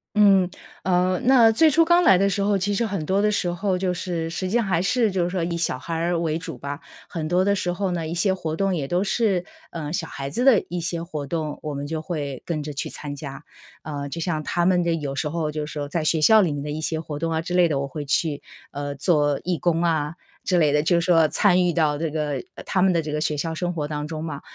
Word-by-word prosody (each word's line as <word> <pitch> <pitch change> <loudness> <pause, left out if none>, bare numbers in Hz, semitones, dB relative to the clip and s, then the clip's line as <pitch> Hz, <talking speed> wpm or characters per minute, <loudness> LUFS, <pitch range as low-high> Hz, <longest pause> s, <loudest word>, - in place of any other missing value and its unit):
嗯， 195 -3 +5 0.3
呃 180 0 +2
那 245 -4 +6
最 315 +8 +5
初 330 +3 +4
刚 345 +1 +5
来 190 - +6
的 200 +1 +2
时 200 +1 -1
候， 200 0 +2
其 205 +2 -1
实 230 +3 +1
很 195 -7 -3
多 195 +4 +1
的 210 0 +2
时 180 -3 0
候 185 +1 -1
就 180 -1 0
是 170 -2 -3
实 185 +2 -3
际 225 - -1
上 235 -3 +2
还 175 -3 +1
是 225 +1 +2
就 185 -2 0
是 175 - -1
说 180 -2 -2
以 170 0 -2
小 165 - -1
孩 165 +6 -6
儿 170 +1 0
为 160 -1 0
主 165 - -7
吧。 145 +1 -6 0.3
很 160 -2 -4
多 180 +3 +2
的 200 0 +3
时 180 -2 -1
候 190 +1 -2
呢， 165 -2 -2
一 170 - -4
些 190 +2 +2
活 160 -4 -3
动 195 +1 0
也 140 -5 -3
都 180 +5 +1
是， 195 -4 +1 0.3
呃 150 -3 -5
小 165 -2 -2
孩 135 0 -6
子 240 - -2
的 260 -7 +5
一 175 0 -3
些 170 0 -3
活 150 -5 -5
动， 155 -3 -3
我 150 -1 -4
们 140 +1 -4
就 155 +1 -3
会 145 -6 -4
跟 155 -3 -2
着 150 0 -5
去 140 - -4
参 145 -1 -6
加。 135 -1 -8 0.4
呃 145 -2 -5
就 165 - -5
像 160 -2 -2
他 175 0 0
们 180 -1 +3
的 170 -1 +1
有 145 -3 -4
时 150 +1 -1
候 160 -1 -2
就 150 0 -3
是 150 - -9
说 145 -1 -4
在 160 +2 -2
学 160 +1 +2
校 215 +8 +6
里 175 -6 +1
面 145 -1 -3
的 150 - -5
一 155 +1 -4
些 160 0 -1
活 155 -2 -6
动 165 +1 -1
啊 160 - 0
之 175 +2 -5
类 180 -1 +5
的， 145 -3 -1
我 140 - -2
会 150 +1 -6
去， 145 +1 0 0.3
呃 145 0 -4
做 145 -1 +2
义 180 -2 -1
工 170 -1 +1
啊 160 -2 0 0.3
之 180 - +1
类 150 -3 +4
的， 150 0 +3
就 170 +1 +3
是 170 - -2
说 165 -3 +5
参 185 +2 +3
与 175 - +2
到 155 -3 +2
这 160 +1 -2
个 150 -4 -2 0.2
他 185 - 0
们 190 - +4
的 165 - +2
这 155 -1 -5
个 150 0 -2
学 150 -1 0
校 160 +3 -2
生 175 +1 -2
活 150 -3 -3
当 150 0 -4
中 155 0 -5
嘛。 145 -4 -5
165 Hz, 300 characters per minute, -23 LUFS, 150-185 Hz, 0.4 s, 那